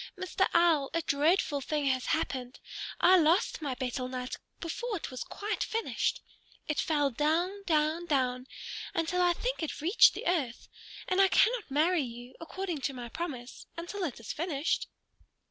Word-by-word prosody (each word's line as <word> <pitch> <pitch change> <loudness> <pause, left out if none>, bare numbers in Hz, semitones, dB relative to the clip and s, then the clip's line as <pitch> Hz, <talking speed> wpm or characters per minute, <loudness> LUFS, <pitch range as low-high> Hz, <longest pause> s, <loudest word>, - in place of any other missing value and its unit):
Mr. 370 +1 +1
Owl, 330 -5 +4
a 335 - +1
dreadful 295 0 +2
thing 295 +1 -1
has 260 -2 +1
happened. 260 -6 -2 0.4
I 370 +2 +7
lost 335 +1 +3
my 280 -4 -2
betel 255 0 -3
nut, 255 0 -4 0.2
before 420 +6 -3
it 325 - -6
was 255 - -4
quite 415 +1 -4
finished. 455 0 -1 0.4
It 300 - -1
fell 290 -3 +2
down, 335 - 0
down, 315 +1 +1
down, 255 -4 0 0.5
until 330 +2 +1
I 355 -1 +4
think - - -3
it 320 - -3
reached 345 +9 +6
the - - -6
earth. 290 -10 -1 0.4
And 370 0 +3
I 390 - +7
cannot 460 +2 +3
marry 315 +5 +3
you, 245 -1 -7
according 345 -2 -4
to 275 +1 -1
my 240 -1 -6
promise, 255 -4 -6
until 355 +4 -4
it 285 -10 -3
is 225 - -5
finished." 315 -2 -1
315 Hz, 165 wpm, -30 LUFS, 265-355 Hz, 0.5 s, I